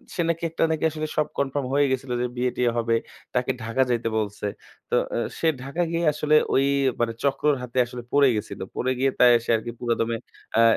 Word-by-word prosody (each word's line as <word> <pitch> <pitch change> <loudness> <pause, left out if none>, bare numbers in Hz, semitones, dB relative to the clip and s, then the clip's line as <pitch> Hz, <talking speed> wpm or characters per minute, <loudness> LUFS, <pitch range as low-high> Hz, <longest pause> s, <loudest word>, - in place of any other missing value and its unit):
সে 175 - 0
নাকি 170 0 -1
একটা 165 - -1
নাকি 160 0 -1
আসলে 155 0 -3
সব 150 0 +2
কনফার্ম 140 -1 -1
হয়ে 145 0 +4
গেছিলো 130 -1 -2
যে - - +1
বিয়ে 125 0 +1
টিয়ে 120 -1 +2
হবে। 115 0 +2 0.4
তাকে 125 +1 +1
ঢাকা 115 +4 0
যাইতে 115 -1 0
বলছে। 105 -1 -3 0.4
তো - - +1 0.2
এ - - 0 0.2
সে 165 - +1 0.2
ঢাকা 140 +6 -3
গিয়ে 170 0 0
আসলে 150 0 +2 0.2
ওই 135 +1 +4 0.3
মানে 115 -1 +1
চক্রর 145 +1 +2
হাতে 125 0 -7
আসলে 120 0 -8
পড়ে 140 -1 +5
গেছিল। 105 - -5 0.2
পড়ে 130 - 0
গিয়ে 135 +1 +3
তাই 125 -1 +8
সে - - -9
আরকি 120 +2 -6
পুরাদমে 115 -1 0 0.4
অ্যা 115 - +5
130 Hz, 205 wpm, -25 LUFS, 120-145 Hz, 0.4 s, তাই